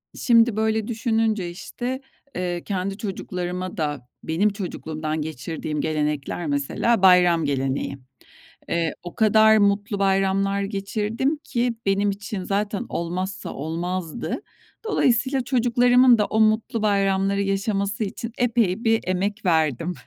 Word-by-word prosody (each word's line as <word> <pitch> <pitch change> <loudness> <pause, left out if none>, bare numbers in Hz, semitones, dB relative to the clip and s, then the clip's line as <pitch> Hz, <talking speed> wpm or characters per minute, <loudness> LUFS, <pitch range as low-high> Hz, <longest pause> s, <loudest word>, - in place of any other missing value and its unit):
Şimdi 230 -2 +4
böyle 220 0 0
düşününce, 220 -5 0
işte, 245 +8 -5 0.3
eee, 175 -1 -2
kendi 195 0 -3
çocuklarıma 185 -3 -4
da 145 -6 -3 0.2
benim 175 +7 +1
çocukluğumdan 160 -6 -4
geçirdiğim 155 0 -4
gelenekler 150 +1 -2
mesela 145 +10 0
bayram 180 -3 +5
geleneği. 135 0 -1 0.7
Eee, 165 -2 0
o 175 - -8
kadar 220 0 +5
mutlu 205 0 +1
bayramlar 195 0 +1
geçirdim 210 +7 -1
ki 240 -1 -1
benim 200 +1 +2
için 200 -1 -5
zaten 200 +1 -1
olmazsa 185 +3 -4
olmazdı. 170 - -4 0.4
Dolayısıyla 265 - +2
çocuklarımın 245 0 +4
da 210 - +2
o 220 - -1
mutlu 220 +1 +2
bayramları 195 -1 +1
yaşaması 200 +1 -1
için 225 +3 -5
epey 230 -4 +1
bir 225 0 +3
emek 195 +3 -1
verdim. 160 -1 +1
195 Hz, 115 wpm, -23 LUFS, 175-220 Hz, 0.7 s, bayram